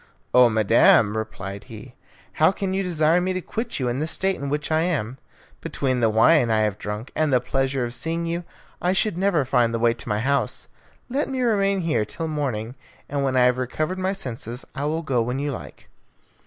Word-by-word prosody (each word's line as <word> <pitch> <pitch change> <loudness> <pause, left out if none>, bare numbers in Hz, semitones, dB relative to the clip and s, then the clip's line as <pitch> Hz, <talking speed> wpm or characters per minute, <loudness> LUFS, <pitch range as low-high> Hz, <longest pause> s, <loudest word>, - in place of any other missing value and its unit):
"Oh, 125 -1 +7
madam," 110 -1 +4
replied 100 -3 -5
he, 125 +1 -11 0.5
"how 160 - +6
can 195 -1 -3
you 195 - 0
desire 170 -2 +2
me 185 +1 -1
to 185 - -2
quit 225 +2 -4
you 130 - -1
in 120 +2 -1
the 155 - -1
state 190 +3 0
in 140 -4 -5
which 150 +2 -2
I 155 0 +3
am? 135 -8 -2 0.4
Between 130 -2 -1
the 115 -2 +3
wine 120 +4 +4
I 110 -1 +2
have 105 -1 -1
drunk, 105 +4 -5
and 155 -2 +1
the 125 - +4
pleasure 135 0 -1
of 120 - -5
seeing 165 +4 -2
you, 170 +1 -2 0.4
I 180 +1 +2
should 200 0 +1
never 180 -6 +1
find 120 -3 +2
the - - +1
way 115 0 +3
to 115 - -9
my 105 - +1
house. 140 +6 -1 0.4
Let 275 +4 -1
me 265 -1 -3
remain 200 -5 +2
here 155 -10 +1
till 160 +10 -5
morning, 130 -7 -3 0.3
and 140 -1 -2
when 135 -1 0
I - - +5
have 125 0 +3
recovered 155 +8 -2
my 190 +1 0
senses 125 - -7
I 140 - -3
will 160 +2 -1
go 130 -6 +1
when 125 +3 -2
you 145 +1 -2
like." 125 - -9
140 Hz, 215 wpm, -23 LUFS, 120-170 Hz, 0.5 s, Oh